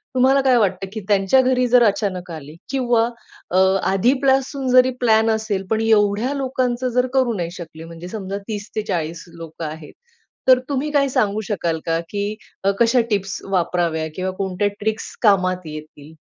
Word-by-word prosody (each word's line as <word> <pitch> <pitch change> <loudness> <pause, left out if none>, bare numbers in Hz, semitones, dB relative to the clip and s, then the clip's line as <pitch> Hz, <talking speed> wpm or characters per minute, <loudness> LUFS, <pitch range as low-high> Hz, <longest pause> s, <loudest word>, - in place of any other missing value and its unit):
तुम्हाला 265 +2 +4
काय 260 -2 +4
वाटतं 195 -3 0
की 220 - -5
त्यांच्या 200 +4 +3
घरी 255 -1 +2
जर 245 0 +5
अचानक 195 -4 -1
आले 155 -1 -9
किंवा 240 -4 +2 0.5
अ, 180 - +1 0.3
आधीपासून 265 +5 +1
जरी 255 0 +6
प्लॅन 225 -2 +3
असेल, 215 -3 -2
पण 220 0 +1
एवढ्या 220 +3 +2
लोकांचं 255 -2 -1
जर 250 +1 +1
करू 260 -3 +2
नाही 170 -1 -3
शकले, 165 -3 -10
म्हणजे 165 +1 -9
समजा 195 -1 -5
30-40 200 -6 -4
लोकं 165 0 -7
आहेत, 155 0 -8 0.5
तर 255 -1 +7
तुम्ही 285 +1 -1
काय 285 -2 +3
सांगू 215 -4 0
शकाल 170 -6 -2
का, 165 0 0
की 205 +1 -3 0.4
कशा 235 +2 +4
टिप्स 195 -2 -1
वापराव्या 170 -3 0
किंवा 185 0 -2
कोणत्या 195 +1 -1
ट्रिक्स 220 +1 -3
कामात 185 -4 +2
येतील? 155 0 -10
210 Hz, 155 wpm, -20 LUFS, 180-250 Hz, 0.5 s, तर